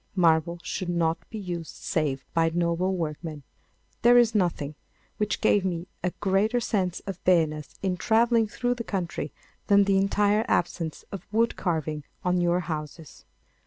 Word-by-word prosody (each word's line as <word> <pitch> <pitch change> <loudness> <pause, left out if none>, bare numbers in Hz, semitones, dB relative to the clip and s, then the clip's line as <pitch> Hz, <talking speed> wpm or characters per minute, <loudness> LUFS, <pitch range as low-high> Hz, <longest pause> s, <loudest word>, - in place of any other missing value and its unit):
Marble 170 -1 +3
should 185 - -3
not 165 -1 0
be 220 - -6
used 175 -5 -5
save 140 -5 -2
by 165 0 +3
noble 175 +2 0
workmen. 155 -2 -4 0.6
There 240 +1 +7
is 235 -2 +5
nothing 170 -7 0 0.4
which 210 0 -1
gave 205 - +4
me 175 -2 -2 0.2
a 180 - +2
greater 205 +5 +2
sense 190 -6 -1
of 195 -3 -7
barrenness 155 -4 +1
in 185 -2 0
travelling 225 +4 +3
through 245 +3 -1
the 240 -1 -5
country 175 - -3 0.4
than 200 0 +6
the 195 -1 +2
entire 205 +2 +2
absence 165 -2 -1
of 195 -3 -7
wood 230 +2 +2
carving 155 -4 -2 0.2
on 180 0 +2
your 175 +1 +2
houses. 155 -1 -7
180 Hz, 155 wpm, -26 LUFS, 165-205 Hz, 0.6 s, There